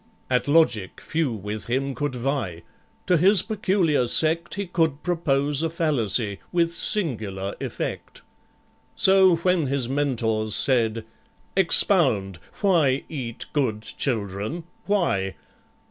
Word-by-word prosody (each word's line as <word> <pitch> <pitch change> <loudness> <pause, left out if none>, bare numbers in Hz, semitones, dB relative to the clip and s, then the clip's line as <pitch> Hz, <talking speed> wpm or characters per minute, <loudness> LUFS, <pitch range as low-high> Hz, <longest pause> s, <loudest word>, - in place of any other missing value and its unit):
At 125 +1 +1
logic 145 - +2
few 160 -5 -2
with 105 0 -6
him 135 +3 -2
could 145 -1 -3
vie; 120 - -3 0.4
To 180 - +3
his 190 +3 +5
peculiar 185 - 0
sect 165 +6 +2
He 200 +1 -3
could 160 -5 -1
propose 145 -4 0
a 165 - -1
fallacy 120 - 0
With 170 -1 +1
singular 110 - -2
effect. - - -6 0.7
So, 190 -2 +5
when 170 -2 0
his 135 -2 -1
Mentors 115 -6 -1
said, 115 -4 +1 0.5
"Expound— 135 - +3 0.2
Why 160 -10 +2
eat 125 -7 -6
good 115 -7 -1
children—why?" 120 - -3
140 Hz, 110 wpm, -23 LUFS, 110-170 Hz, 0.7 s, his